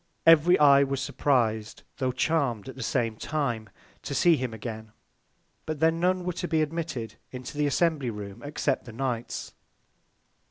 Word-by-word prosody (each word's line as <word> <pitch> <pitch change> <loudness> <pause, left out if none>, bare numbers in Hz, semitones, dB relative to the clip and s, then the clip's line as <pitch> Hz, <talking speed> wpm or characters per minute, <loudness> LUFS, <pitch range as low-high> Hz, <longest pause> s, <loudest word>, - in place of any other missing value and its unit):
Every 165 +2 +7
Eye 140 -2 +7
was 135 -1 0
surpriz'd, 115 -5 0
tho' 130 -2 0
charm'd 130 -4 0
at 130 - -8
the 135 - -8
same 115 -2 -1
Time 120 -9 -2 0.3
to - - -5
see 175 -2 +5
him 130 -4 -3
again: 110 -1 -7 0.7
But 155 -2 -3
then 165 +1 +3
none 180 +1 +1
were 180 0 -2
to 175 +1 -4
be 160 -2 +2
admitted 155 -7 -4
into 125 +2 -7
the 145 0 +1
Assembly 145 -2 +1
Room 100 -3 -7
except 145 +1 -1
the 120 - -10
Knights. 120 -1 -3
135 Hz, 160 wpm, -27 LUFS, 115-160 Hz, 0.7 s, Every